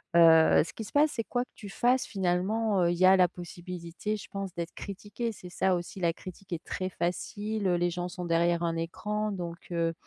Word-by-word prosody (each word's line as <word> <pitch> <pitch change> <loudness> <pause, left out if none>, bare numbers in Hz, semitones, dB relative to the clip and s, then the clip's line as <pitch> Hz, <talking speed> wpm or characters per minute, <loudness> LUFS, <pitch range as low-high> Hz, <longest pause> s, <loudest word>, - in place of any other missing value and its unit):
Heu, 165 -1 +7
ce - - -9
qui 225 - -6
se - - -10
passe 295 +1 +4
c'est 230 - -2
quoi 245 0 0
que - - -20
tu 205 - -10
fasses 245 +5 +2
finalement, 195 +2 +1
heu, 170 - +3
il 175 - -1
y 185 - +5
a 190 +1 +8
la 180 -1 +6
possibilité 175 +2 -5
je - - -10
pense 195 -1 -4
d'être 170 0 -4
critiquée, 205 +4 -5
c'est 180 -3 -11
ça 185 +1 +2
aussi 175 +2 -5
la 170 -2 +2
critique 185 +2 -9
est 170 0 -4
très 185 0 -3
facile, 205 +4 -2
heu, 180 - +3
les 175 0 +2
gens 175 +1 -3
sont 180 0 -6
derrière 170 0 +2
un 165 -1 0
écran 210 +6 -2
donc 170 -3 -5
heu, 165 -1 +1
180 Hz, 225 wpm, -29 LUFS, 170-205 Hz, -, a